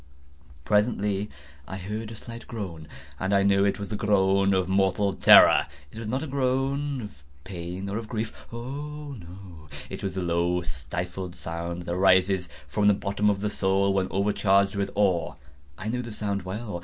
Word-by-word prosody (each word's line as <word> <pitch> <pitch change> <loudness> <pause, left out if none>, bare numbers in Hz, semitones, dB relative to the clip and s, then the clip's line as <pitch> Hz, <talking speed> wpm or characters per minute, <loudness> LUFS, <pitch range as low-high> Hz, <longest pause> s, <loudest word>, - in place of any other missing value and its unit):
Presently 105 -1 +1 0.4
I 95 - -5
heard 105 +4 -5
a - - -7
slight 115 +2 -10
groan, 90 -9 -6 0.3
and 95 +2 +1
I 100 - +4
knew 100 0 +4
it 100 -1 +1
was 100 -1 -6
the 105 - -3
groan 100 -1 +3
of 95 -2 +2
mortal 95 +1 +2
terror. - - +7 0.2
It 110 - -9
was 115 - -5
not 130 +6 -1
a - - -4
groan 135 +1 0
of 95 -10 -11 0.2
pain 90 +1 -6
or 100 +3 -2
of 115 - -8
grief—oh, 135 +6 -6
no!—it 85 -3 -11
was 95 -2 -3
the 95 - -2
low 85 +1 +1
stifled 85 +4 -5
sound 85 +2 -5
that 85 - -3
arises 95 0 +3 0.2
from 105 +9 +1
the 105 - +6
bottom 100 +1 0
of 100 -1 0
the 105 - 0
soul 95 0 +2
when 95 -1 +1
overcharged 100 0 +2
with 100 0 -1
awe. 95 -4 +1 0.4
I 105 - -6
knew 125 +3 -1
the 120 -1 -7
sound 100 -2 -2
well. 95 +1 -5
100 Hz, 175 wpm, -26 LUFS, 90-105 Hz, 0.4 s, terror